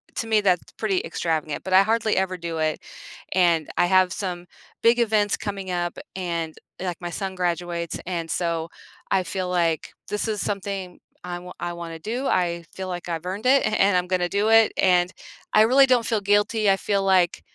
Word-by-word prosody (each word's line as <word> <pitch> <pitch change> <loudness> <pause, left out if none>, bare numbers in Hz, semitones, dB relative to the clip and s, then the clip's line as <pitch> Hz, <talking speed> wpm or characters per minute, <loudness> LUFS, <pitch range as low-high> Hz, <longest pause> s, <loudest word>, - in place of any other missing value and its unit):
to 225 - -2
me, 220 -1 +3
that's 185 -3 +1
pretty 195 -4 0
extravagant, 155 -3 -2
but 190 - -6
I 190 +1 +7
hardly 220 +1 +1
ever 190 -1 0
do 170 -2 -5
it, 155 -1 -1 0.5
and 170 -4 +2
I - - +4
have 185 0 +4
some 180 -2 -4 0.4
big 235 +1 +5
events 215 -3 +2
coming 195 -2 -5
up, 175 -1 -2 0.2
and, 170 -3 -3 0.3
like, 180 -2 -3
my 175 -1 -5
son 190 +2 -4
graduates, 175 -2 -2
and 170 -2 -3
so, 165 -2 -1 0.4
I 190 - +2
feel 185 +1 -3
like, 170 -3 0 0.2
this 210 +2 -1
is 215 -2 -1
something 195 -3 -4 0.2
I 180 0 -5
w 180 +1 -9
I 175 - -2
wanna 170 -1 -7
do, 235 +11 -3
I 170 -2 0
feel 190 -1 -5
like 175 -1 -5
I've 165 -1 -4
earned 195 +5 -4
it, 270 +2 +5
a - - +2
and 195 -1 +4
I'm 180 0 +1
gonna 180 -1 +1
do 205 +4 0
it, 225 -1 +5
and, 180 -1 +3 0.4
I 215 - +6
really 260 +5 +6
don't 250 -3 +3
feel 220 -2 +1
guilty; 205 +1 +2
I 195 - +5
feel 200 0 0
like, 185 -3 +3
185 Hz, 200 wpm, -24 LUFS, 175-205 Hz, 0.5 s, I